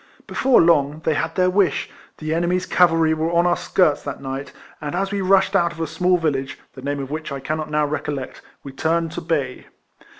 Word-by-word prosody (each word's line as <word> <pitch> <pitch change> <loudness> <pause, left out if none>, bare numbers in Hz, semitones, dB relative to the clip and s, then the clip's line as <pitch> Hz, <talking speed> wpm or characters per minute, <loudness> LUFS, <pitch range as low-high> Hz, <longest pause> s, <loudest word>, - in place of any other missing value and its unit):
Before 260 -1 +3
long, 150 -2 +2
they 160 - +2
had 165 +2 -2
their 185 -1 +3
wish: 185 -6 +1 0.3
the 155 0 -3
enemy's 175 +2 0
cavalry 165 -3 +3
were 160 +1 -1
on 170 0 +3
our 175 0 +3
skirts 155 -6 +1
that 140 - -6
night; 135 0 -5 0.3
and 150 +1 -4
as 195 +2 -1
we 200 -1 -1
rushed 195 +1 +3
out 170 -3 +3
of 165 - -13
a 165 - 0
small 180 +3 +1
village, 140 -5 -2 0.2
the 130 - -11
name 140 +1 -3
of 135 0 -6
which 155 0 -4
I 140 - -4
cannot 155 +2 -3
now 150 0 +1
recollect, 145 -2 -4 0.2
we 140 - -8
turned 165 +4 0
to - - -5
bay. 145 -6 -2
160 Hz, 210 wpm, -21 LUFS, 145-175 Hz, 0.3 s, Before